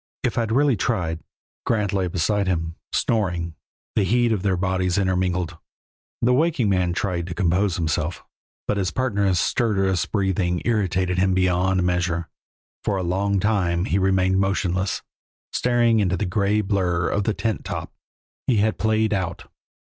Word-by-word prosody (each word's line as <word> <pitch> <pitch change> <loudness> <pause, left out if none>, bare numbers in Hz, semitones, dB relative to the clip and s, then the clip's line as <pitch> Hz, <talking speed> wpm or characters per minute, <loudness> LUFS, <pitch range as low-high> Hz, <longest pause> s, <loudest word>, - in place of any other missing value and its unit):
"If - - 0
I'd 115 -2 -1
really 140 +1 +3
tried 90 -6 -1 0.2
" - - -83
Grant 105 -4 +1
lay 95 -2 +1
beside 95 +3 0
him, 80 -2 -1 0.2
snoring, 90 -7 0 0.4
the - - +3
heat 120 +4 +2
of 105 -4 0
their 95 -2 +1
bodies 95 0 0
intermingled. 90 -3 0 0.6
The 125 +1 +4
waking 145 -5 +2
man 90 -2 +1
tried 90 -2 -2
to 85 - -5
compose 95 +1 +1
himself, 85 -1 -2 0.4
but 105 - 0
his 95 -3 0
partner's 100 -6 +1
stertorous 95 -7 +1
breathing 95 -3 0
irritated 95 -5 +1
him 95 0 +2
beyond 95 0 +2
measure; 90 -2 0 0.5
for 100 - 0
a 95 - -2
long 95 +3 0
time 90 -4 +1
he 95 - +1
remained 95 0 +2
motionless, 95 -1 0 0.5
staring 120 -2 +3
into 95 -3 +1
the 100 - -1
gray 100 +2 +1
blurr 90 -4 0
of 100 -1 0
the 110 - 0
tent 110 -2 -2
top. - - -5 0.5
He 120 - +3
had 110 +1 +1
played 110 0 +2
out. 95 -3 -3
95 Hz, 155 wpm, -23 LUFS, 90-105 Hz, 0.6 s, The